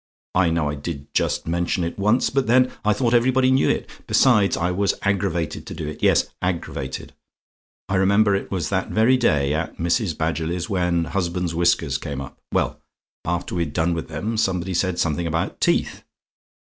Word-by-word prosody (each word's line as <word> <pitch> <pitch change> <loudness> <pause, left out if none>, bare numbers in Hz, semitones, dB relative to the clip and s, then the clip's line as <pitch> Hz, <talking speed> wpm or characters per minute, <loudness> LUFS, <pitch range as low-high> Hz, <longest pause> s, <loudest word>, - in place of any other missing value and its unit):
I 90 -1 +3
know 80 -2 0
I 75 - -2
did 70 0 -7
just - - 0
mention 85 +2 0
it 85 +4 -4
once, 105 +5 +2
but 135 -2 0
then 125 +2 +4
I 105 - +3
thought 120 +3 +1
everybody 130 +2 +3
knew 130 +1 +3
it - - -1 0.2
besides, 105 -7 +4
I 90 +2 0
was 100 +2 +1
aggravated 90 -5 -1
to - - -6
do 75 - -5
it; 75 - -7
yes, - - +4 0.2
aggravated. 80 -7 -4 0.7
I 95 0 0
remember 100 +2 +4
it 100 - -2
was 90 -5 -2
that 95 -2 -1
very 115 +4 +4
day, 75 - +2
at 80 +1 -3
Mrs. 85 +1 0
Badgerly's, 85 +2 -2
when 90 -3 +1
husbands' 90 0 -2
whiskers 85 +1 +1
came - - -5
up. 70 - -9
Well, - - -1 0.4
after 85 +1 -2
we'd 85 -5 -2
done 85 +2 +1
with 80 -1 -4
them, 100 +9 -3
somebody 95 -3 0
said 90 0 0
something 85 +1 0
about 80 +1 -2
teeth. - - +1
90 Hz, 180 wpm, -22 LUFS, 80-100 Hz, 0.7 s, then